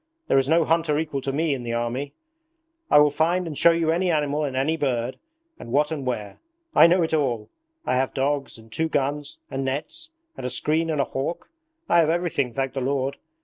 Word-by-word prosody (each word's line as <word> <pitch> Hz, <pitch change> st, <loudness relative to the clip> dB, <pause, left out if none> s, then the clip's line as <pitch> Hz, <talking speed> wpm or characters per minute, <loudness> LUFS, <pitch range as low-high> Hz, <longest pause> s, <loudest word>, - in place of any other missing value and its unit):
There -, -, +5 dB
is 135 Hz, +1 st, 0 dB
no 165 Hz, 0 st, +4 dB
hunter 165 Hz, -1 st, +2 dB
to -, -, +1 dB
equal 150 Hz, -3 st, -2 dB
me 155 Hz, +2 st, 0 dB
in 130 Hz, -, -4 dB
the 120 Hz, -1 st, -4 dB
whole 120 Hz, 0 st, 0 dB
army. 130 Hz, +4 st, -4 dB, 0.7 s
I -, -, +6 dB
will 150 Hz, 0 st, +6 dB
find 170 Hz, +5 st, +1 dB
and 160 Hz, -3 st, -5 dB
show 170 Hz, -, +6 dB
you 165 Hz, -1 st, +2 dB
any 180 Hz, +2 st, +1 dB
animal 150 Hz, -2 st, +1 dB
and 135 Hz, -2 st, -4 dB
any 145 Hz, +5 st, +1 dB
bird, 130 Hz, -5 st, -1 dB, 0.4 s
and 115 Hz, -, -9 dB
what 150 Hz, +4 st, +2 dB
and 140 Hz, -5 st, -4 dB
where. 105 Hz, -5 st, -4 dB, 0.3 s
I -, -, +8 dB
know 175 Hz, +1 st, +3 dB
it 160 Hz, -, -2 dB
all! 120 Hz, -8 st, 0 dB, 0.4 s
I -, -, +1 dB
have 130 Hz, 0 st, -1 dB
dogs, 140 Hz, 0 st, -1 dB
and 110 Hz, 0 st, -17 dB
two 160 Hz, +5 st, 0 dB
guns, 145 Hz, 0 st, -2 dB
and 135 Hz, 0 st, -2 dB
nets, 145 Hz, -, -3 dB, 0.3 s
and -, -, -8 dB
a 125 Hz, -, -1 dB
screen 155 Hz, +7 st, 0 dB
and 155 Hz, -2 st, -1 dB
a -, -, +4 dB
hawk. 135 Hz, -, -4 dB, 0.4 s
I 170 Hz, -, +4 dB
have 160 Hz, -2 st, +4 dB
everything, 165 Hz, -7 st, 0 dB
thank 135 Hz, +2 st, -2 dB
the 135 Hz, -, -3 dB
Lord! 135 Hz, +1 st, -1 dB
145 Hz, 225 wpm, -24 LUFS, 130-160 Hz, 0.7 s, I